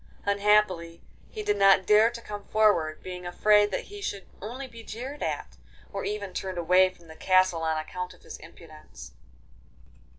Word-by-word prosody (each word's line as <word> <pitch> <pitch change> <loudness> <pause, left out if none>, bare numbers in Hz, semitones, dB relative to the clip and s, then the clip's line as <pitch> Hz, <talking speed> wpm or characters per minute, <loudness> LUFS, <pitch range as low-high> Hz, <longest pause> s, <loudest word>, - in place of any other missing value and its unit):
Unhappily 200 -4 +1 0.3
he 430 - -6
did 415 0 0
not 195 -1 +5
dare 215 +2 +5
to 235 0 -9
come 205 -2 -8
forward, 205 -8 +2
being 180 -1 -7
afraid 205 +4 +3
that - - -3
he 410 0 -11
should 200 - -4 0.2
only 245 +7 -6
be 230 -3 -12
jeered 255 +7 -7
at, - - -4 0.4
or - - -4
even 205 -3 -4
turned 190 -1 -4
away 180 +2 +4
from 175 -2 -20
the 160 - -12
castle 185 -1 +2
on 160 -1 0
account 180 +3 -6
of - - -25
his - - -9
impudence. 155 - -13
190 Hz, 170 wpm, -27 LUFS, 170-210 Hz, 0.4 s, not